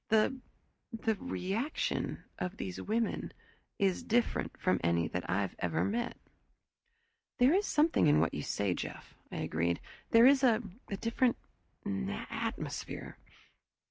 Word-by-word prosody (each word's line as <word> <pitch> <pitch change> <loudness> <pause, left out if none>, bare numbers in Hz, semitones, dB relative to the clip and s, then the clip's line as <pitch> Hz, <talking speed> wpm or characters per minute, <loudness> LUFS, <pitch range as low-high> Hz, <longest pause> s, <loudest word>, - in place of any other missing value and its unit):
The 220 +4 +3 0.5
the 225 0 0
reaction 220 +3 -2 0.2
of 180 - -3
these 90 -2 -4
women 225 +2 -1 0.4
is 195 -5 +2
different 235 +1 0
from - - +2
any 85 -1 +2
that 90 +2 -4
I've 95 +2 0
ever 85 - +1
met." 235 +4 -1 1.2
"There 260 +3 +5
is 400 +3 +2
something 300 - +4
in 145 - +5
what - - +2
you - - -2
say, 100 -3 0
Jeff," - - -6 0.2
I - - -6
agreed. 85 +2 0 0.3
"There 230 +1 +7
is 270 0 +7
a 240 -3 +4 0.3
different 235 +3 +1 0.5
atmosphere." 95 -10 -4
220 Hz, 125 wpm, -32 LUFS, -, 1.2 s, There